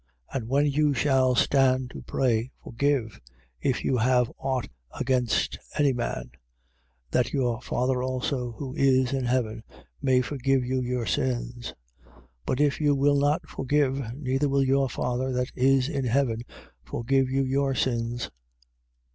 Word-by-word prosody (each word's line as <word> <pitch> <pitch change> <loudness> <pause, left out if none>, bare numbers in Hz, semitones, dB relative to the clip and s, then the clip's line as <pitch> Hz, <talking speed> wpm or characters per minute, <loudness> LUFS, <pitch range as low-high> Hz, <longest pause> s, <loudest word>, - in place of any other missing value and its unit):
11:25. - - -7
And 115 -1 -8
when 140 +2 +3
you 145 0 +2
shall 130 -1 +3
stand 130 -1 +3
to - - -8
pray, 120 -2 0
forgive, 125 -2 -1 0.4
if 130 - 0
you 130 - +2
have 125 +1 +2
aught 130 -2 -1 0.3
against 125 -3 0 0.2
any 145 -3 +3
man: 90 - -3 0.8
that 125 - +1
your 125 -3 0
Father 125 +1 0
also, 130 -1 -2
who 130 +2 -6
is 130 -1 +3
in 135 -2 -1
heaven, 120 -3 0 0.4
may 130 -2 +3
forgive 135 -1 0
you 130 +1 0
your 125 -1 -2
sins. 120 -1 -2 0.3
11:26. - - -24 0.3
But 130 - 0
if 145 0 +2
you 145 -1 +3
will 140 +1 +3
not 145 +2 +1
forgive, 135 -3 -1
neither 135 0 0
will 140 0 +2
your 135 0 +2
father 125 +2 -2
that 125 +1 -1
is 130 0 +3
in 140 -4 -2
heaven 120 -2 +1 0.4
forgive 130 - 0
you 135 +1 +1
your 135 +1 0
sins. 120 -2 -1
130 Hz, 150 wpm, -26 LUFS, 125-135 Hz, 0.8 s, when